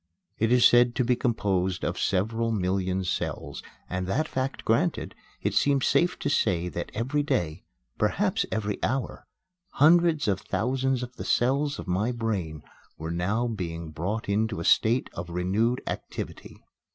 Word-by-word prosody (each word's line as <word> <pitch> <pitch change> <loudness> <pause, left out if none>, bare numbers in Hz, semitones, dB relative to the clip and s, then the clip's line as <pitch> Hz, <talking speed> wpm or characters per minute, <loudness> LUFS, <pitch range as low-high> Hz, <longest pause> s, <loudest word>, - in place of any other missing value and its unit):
It 110 +1 +2
is 125 -1 +6
said 120 0 +6
to 130 - +2
be 125 +1 +3
composed 95 -7 0
of - - -2
several 110 +4 0
million 95 -2 0
cells; 90 - -3 0.3
and, 90 0 -3
that 155 +11 0
fact 130 -1 -3
granted, 155 +10 +1 0.3
it - - 0
seems 140 -2 +3
safe 175 +1 +2
to - - -1
say 90 -11 +1
that 85 0 -5
every 130 +7 0
day, 85 - -1 0.3
perhaps - - +1
every 105 -2 -2
hour, 130 +3 -2 0.5
hundreds 160 -1 +4
of 95 -2 +1
thousands 130 +5 0
of 125 0 -9
the - - -5
cells 140 +4 +1
of - - -8
my 100 +7 0
brain 100 -10 -3 0.3
were 80 +1 -5
now 100 +8 0
being 85 -7 -4
brought 95 +8 -3
into 105 0 0
a 85 - -4
state 115 +3 +3
of 85 0 -6
renewed 100 +8 0
activity. - - -6
110 Hz, 155 wpm, -27 LUFS, 90-125 Hz, 0.5 s, is